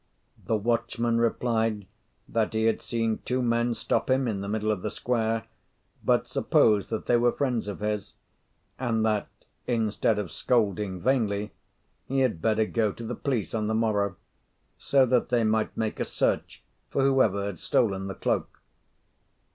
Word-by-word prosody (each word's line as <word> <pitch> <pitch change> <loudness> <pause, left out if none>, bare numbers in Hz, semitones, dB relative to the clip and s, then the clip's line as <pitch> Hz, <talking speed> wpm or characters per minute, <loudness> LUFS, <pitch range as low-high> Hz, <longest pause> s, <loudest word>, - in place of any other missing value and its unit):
The 110 - +1
watchman 115 +1 0
replied 115 -3 0 0.4
that 110 -1 -1
he 110 - +1
had 115 - +2
seen 115 -2 -1
two 125 +1 -1
men 120 0 +1
stop 115 - -1
him 130 0 +2
in 100 -4 -2
the 100 - -5
middle 110 +1 0
of 105 -4 -2
the - - -2
square, 115 -2 -1 0.6
but - - +2
supposed 105 -2 +3
that 110 - -3
they 120 - +4
were 120 0 +3
friends 125 -6 -1
of 105 - -5
his; 105 -2 -3 0.6
and 115 -3 0
that, 105 -2 +1 0.4
instead 110 -2 +1
of 100 -6 -3
scolding 105 -5 0
vainly, 105 -4 +1 0.6
he 135 0 +1
had 110 -11 +1
better 110 +2 +2
go 110 -1 0
to 115 - -9
the 120 - -3
police 125 -4 -2
on 110 -2 -1
the 110 - 0
morrow, 105 -4 +1 0.6
so 135 -2 +3
that 125 0 +1
they 120 -2 +2
might 110 0 0
make 110 -1 -2
a - - 0
search - - -1 0.3
for 135 - +1
whoever 115 -8 +3
had 100 -5 -5
stolen 95 -4 +1
the 95 - -5
cloak. - - -2
110 Hz, 165 wpm, -27 LUFS, 105-120 Hz, 0.6 s, they